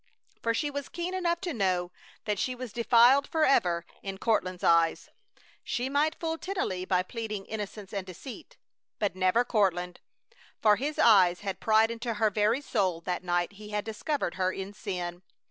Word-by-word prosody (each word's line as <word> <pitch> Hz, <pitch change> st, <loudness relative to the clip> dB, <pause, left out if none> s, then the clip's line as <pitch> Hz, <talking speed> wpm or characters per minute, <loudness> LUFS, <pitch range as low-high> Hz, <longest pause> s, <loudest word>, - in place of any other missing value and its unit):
For 230 Hz, 0 st, 0 dB
she 295 Hz, +4 st, -1 dB
was 285 Hz, -1 st, -5 dB
keen 345 Hz, +1 st, -4 dB
enough 345 Hz, -2 st, 0 dB
to 355 Hz, -4 st, -3 dB
know 185 Hz, -4 st, 0 dB, 0.3 s
that 210 Hz, -2 st, -1 dB
she 255 Hz, -, -1 dB
was 250 Hz, -3 st, -7 dB
defiled 240 Hz, +4 st, +5 dB
forever 180 Hz, -, +2 dB, 0.2 s
in 195 Hz, -1 st, -5 dB
Courtland's 185 Hz, -4 st, 0 dB
eyes. 165 Hz, -1 st, +3 dB, 0.5 s
She 250 Hz, +2 st, -2 dB
might 300 Hz, +3 st, +1 dB
fool 325 Hz, -1 st, -2 dB
Tennelly 360 Hz, -, -2 dB
by 185 Hz, -1 st, +2 dB
pleading 215 Hz, -1 st, -5 dB
innocence 210 Hz, -2 st, -6 dB
and 200 Hz, -2 st, -2 dB
deceit, 260 Hz, -, -10 dB, 0.4 s
but 200 Hz, -4 st, -1 dB
never 185 Hz, +6 st, +2 dB
Courtland. 180 Hz, -6 st, 0 dB, 0.6 s
For 210 Hz, -2 st, +5 dB
his 290 Hz, +6 st, -3 dB
eyes 185 Hz, -6 st, +5 dB
had 195 Hz, -2 st, -4 dB
pried 220 Hz, +1 st, +4 dB
into 230 Hz, 0 st, -3 dB
her 215 Hz, 0 st, +2 dB
very 215 Hz, +6 st, +2 dB
soul 190 Hz, -, 0 dB
that 180 Hz, +1 st, -3 dB
night 175 Hz, 0 st, 0 dB
he 210 Hz, +1 st, -11 dB
had 210 Hz, -1 st, -2 dB
discovered 225 Hz, -, -2 dB
her 185 Hz, 0 st, +2 dB
in 195 Hz, +1 st, -6 dB
sin. 180 Hz, -4 st, -5 dB
210 Hz, 170 wpm, -29 LUFS, 185-255 Hz, 0.6 s, defiled